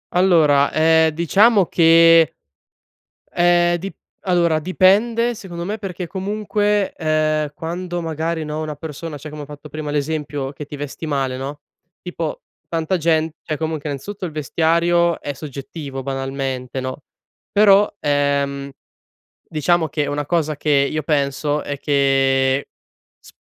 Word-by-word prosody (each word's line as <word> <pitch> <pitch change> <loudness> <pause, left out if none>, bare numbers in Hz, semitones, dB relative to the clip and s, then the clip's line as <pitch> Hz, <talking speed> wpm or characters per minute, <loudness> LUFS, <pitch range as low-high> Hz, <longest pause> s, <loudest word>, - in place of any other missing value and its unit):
Allora, 155 -6 +4
ehm, 160 0 +4
diciamo 195 +6 +4
che, 165 -2 +5 0.9
ehm, 175 0 +3
dip 190 +3 -6 0.3
allora 170 -4 +2
dipende 210 +7 +3
secondo 175 -4 -7
me, 210 +3 -3
perché 185 -3 -5
comunque, 205 +2 -1
ehm, 155 -2 0
quando 175 +2 -4
magari 160 0 -3
no, 150 +1 -4
una 155 -1 -4
persona 155 0 -7
cioè 155 +2 -9
come 150 0 -8
ho 145 - -7
fatto 145 +1 -11
prima 150 0 -5
l'esempio 145 -2 -2
che 150 - -8
ti 145 - -8
vesti 145 +3 -6
male 135 -3 -1
no? 140 +2 -6 0.4
Tipo 170 -3 -5 0.3
tanta 165 +2 -1
gent 160 -1 +1
cioè 155 -2 -3
comunque 155 -1 -3
innanzitutto 185 +8 -5
il 170 - -5
vestiario 170 +3 +1
è 145 - -5
soggettivo 140 -1 -7
banalmente 135 -1 -3
no? 130 +2 -5 0.5
Però, 205 0 +5
ehm, 140 -1 0 0.8
diciamo 160 +1 +1
che, 150 -2 -1
una 145 0 -2
cosa 155 -1 0
che 150 - -4 0.2
io 155 -1 -2
penso 145 0 0
è 140 -1 -5
che, 135 -1 +2 0.5
sp - - -18
155 Hz, 135 wpm, -20 LUFS, 145-175 Hz, 0.9 s, che